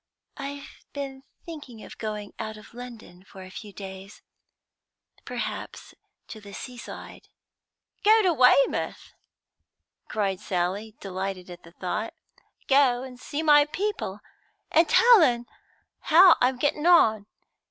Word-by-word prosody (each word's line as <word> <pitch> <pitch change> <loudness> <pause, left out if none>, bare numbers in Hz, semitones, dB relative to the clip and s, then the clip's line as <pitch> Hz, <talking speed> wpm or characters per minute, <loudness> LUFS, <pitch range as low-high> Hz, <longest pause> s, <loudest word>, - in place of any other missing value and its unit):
"I've 280 0 -8
been 275 -2 -6 0.2
thinking 290 -9 -10
of - - -12
going 210 -2 -5
out 215 -1 -5
of 215 - -15
London 230 -7 -11
for 190 0 -13
a 185 - -12
few 210 +2 -9
days, 195 0 -10 1.0
perhaps - - -6 0.4
to 215 - -9
the 200 -1 -12
seaside." 245 +3 -9 0.8
"Go 435 +1 +6
to 360 -3 +3
Weymouth!" 290 - +2 0.9
cried 195 -3 -1
Sally, 200 +3 -3
delighted 190 -1 -5
at 175 0 -11
the 170 - -17
thought. 205 +5 -4 0.5
"Go 265 -3 +4
and 255 -2 -10
see 290 +4 -4
my 295 -2 +6
people, 315 - -4 0.5
and 325 +1 +4
tell 470 -4 +7
un 240 -4 +1 0.5
how 345 +2 +7
I'm 250 +1 +2
getting 295 +4 0
on. 220 - +5
240 Hz, 125 wpm, -26 LUFS, 200-290 Hz, 1.0 s, tell